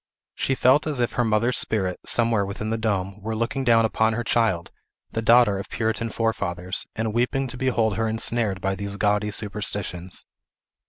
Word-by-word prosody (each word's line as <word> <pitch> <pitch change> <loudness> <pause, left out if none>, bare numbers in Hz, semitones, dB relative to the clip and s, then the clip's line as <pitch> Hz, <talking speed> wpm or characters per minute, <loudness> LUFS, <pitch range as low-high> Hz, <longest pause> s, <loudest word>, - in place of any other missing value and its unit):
She 135 - -1
felt 130 +5 +4
as 145 -4 0
if 120 - +1
her 120 - 0
mother's 115 +2 +1
spirit, 95 -5 0
somewhere 115 -3 +3
within 100 +2 -4
the - - +1
dome, 100 -2 -2
were 110 +2 -3
looking 115 +4 -1
down 115 -2 +4
upon 110 0 +1
her 120 +2 -2
child, 110 -8 0 0.4
the 115 - -2
daughter 115 -3 +5
of 100 - -7
Puritan 115 0 -1
forefathers, 95 -5 -2
and 110 -1 -2
weeping 125 +3 0
to 125 - -6
behold 120 -5 0
her 115 0 0
ensnared 110 -2 0
by 95 0 0
these 100 0 -5
gaudy 105 +1 +1
superstitions. 100 -3 -2
110 Hz, 175 wpm, -24 LUFS, 100-115 Hz, 0.4 s, daughter